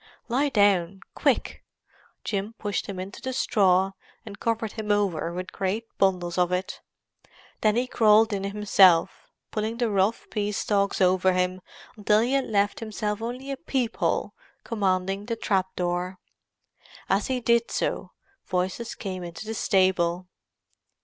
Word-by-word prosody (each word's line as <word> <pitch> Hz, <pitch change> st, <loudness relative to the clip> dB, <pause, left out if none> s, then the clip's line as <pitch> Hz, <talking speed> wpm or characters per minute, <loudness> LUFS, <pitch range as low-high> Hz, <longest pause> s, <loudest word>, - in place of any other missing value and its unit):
"Lie 275 Hz, +5 st, +2 dB
down—quick!" 195 Hz, -5 st, +1 dB, 0.6 s
Jim 205 Hz, +2 st, -3 dB
pushed 205 Hz, -1 st, -3 dB
him 195 Hz, -3 st, -5 dB
into 190 Hz, +2 st, -7 dB
the 260 Hz, -, -3 dB
straw 190 Hz, -5 st, +3 dB, 0.3 s
and 205 Hz, -2 st, -9 dB
covered 225 Hz, -2 st, -1 dB
him 215 Hz, -2 st, -6 dB
over 190 Hz, -6 st, 0 dB
with 180 Hz, +2 st, -6 dB
great 195 Hz, +4 st, -2 dB, 0.2 s
bundles 180 Hz, -2 st, +1 dB
of 180 Hz, 0 st, +2 dB
it. 180 Hz, +1 st, -3 dB, 0.8 s
Then 215 Hz, -1 st, +3 dB
he 245 Hz, +2 st, +1 dB
crawled 220 Hz, -3 st, +4 dB
in 195 Hz, -1 st, -2 dB
himself, 200 Hz, -4 st, +3 dB, 0.2 s
pulling 220 Hz, +1 st, -2 dB
the 235 Hz, -3 st, 0 dB
rough 200 Hz, +3 st, +1 dB
pea 210 Hz, -1 st, -1 dB
stalks 200 Hz, -1 st, 0 dB
over 185 Hz, 0 st, +4 dB
him 180 Hz, 0 st, 0 dB, 0.3 s
until 210 Hz, 0 st, +3 dB
he 245 Hz, +3 st, 0 dB
had 275 Hz, -1 st, +2 dB
left 205 Hz, -2 st, +1 dB
himself 215 Hz, -1 st, -3 dB
only 250 Hz, +4 st, -5 dB
a 275 Hz, -, -3 dB
peep 255 Hz, -3 st, -2 dB
hole -, -, 0 dB, 0.3 s
commanding 195 Hz, -2 st, -1 dB
the 230 Hz, -, -1 dB
trap 195 Hz, -4 st, 0 dB
door. 180 Hz, +1 st, -2 dB, 0.9 s
As 195 Hz, +2 st, +1 dB
he 260 Hz, -1 st, -1 dB
did 235 Hz, -1 st, +2 dB
so, -, -, -2 dB, 0.4 s
voices 185 Hz, +5 st, -2 dB
came 185 Hz, -3 st, -5 dB
into 170 Hz, +4 st, -8 dB
the 220 Hz, -, -4 dB
stable. 185 Hz, -4 st, +1 dB
200 Hz, 145 wpm, -26 LUFS, 185-225 Hz, 0.9 s, crawled